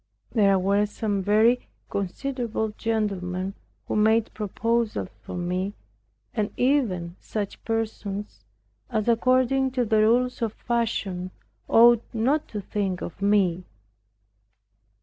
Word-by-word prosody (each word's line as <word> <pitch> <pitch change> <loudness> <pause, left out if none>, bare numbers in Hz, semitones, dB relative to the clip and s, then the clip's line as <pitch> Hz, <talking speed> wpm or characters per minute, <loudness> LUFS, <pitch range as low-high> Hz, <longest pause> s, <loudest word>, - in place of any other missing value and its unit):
There 200 -4 +4
were 200 +2 +2
some 205 -1 -2
very 220 +5 +3 0.2
considerable 220 +3 -2
gentlemen 195 -4 -2 0.3
who - - -2
made 220 +1 +3
proposals 215 - -1
for - - -7
me, 180 +3 -2 0.6
and 210 -3 0
even 205 -11 +1
such 205 -2 -5
persons 210 - -3 0.5
as 215 0 -1
according 255 +3 +3
to 250 -2 +1
the 220 0 +2
rules 245 +4 +2
of 225 -2 -1
fashion 205 -6 -2 0.4
ought 235 0 +7
not 270 +7 +1
to 210 - -5
think 195 -2 -2
of 175 - -8
me. 195 -3 +2
215 Hz, 110 wpm, -25 LUFS, 195-235 Hz, 0.6 s, ought